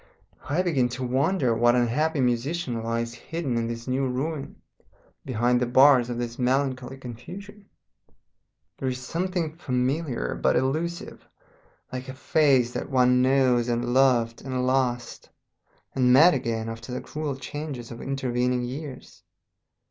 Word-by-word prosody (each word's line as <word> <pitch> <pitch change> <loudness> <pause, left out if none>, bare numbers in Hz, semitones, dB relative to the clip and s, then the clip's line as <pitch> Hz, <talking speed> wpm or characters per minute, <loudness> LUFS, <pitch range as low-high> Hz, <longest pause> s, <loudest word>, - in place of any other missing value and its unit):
I 165 +6 +1
begin 135 -9 +1
to 130 - -4
wonder 130 +1 +1
what 120 +1 +3
unhappy 140 +6 +1
musician 125 +1 -1
lies 115 +1 -2
hidden 140 +1 -4
in 115 -1 0
this 115 +1 -6
new 130 +1 0
ruin, 135 +3 -3 0.7
behind 125 -1 +1
the 125 - +1
bars 130 -1 +6
of 120 - -3
this 120 +1 -4
melancholy 130 0 0
confusion. 190 - -10 1.1
There 130 - -1
is 125 - -3
something 170 +2 -2
familiar 130 - -1
but - - +1
elusive, 155 +7 -2 0.6
like 130 +1 -5
a 130 - -7
face 135 -4 +3
that - - -4
one 125 -1 +4
has 130 -3 +3
known - - -2
and 120 0 -2
loved 125 -3 +3
and 130 -1 -2
lost 125 -2 -1 0.6
and 125 -1 +3
met 155 +8 +7
again 115 -4 -2
after 115 +2 -7
the 125 - -3
cruel 150 -2 -4
changes 135 -2 -6
of 120 - -8
intervening 125 -2 -1
years. 130 +2 -7
130 Hz, 140 wpm, -25 LUFS, 120-140 Hz, 1.1 s, met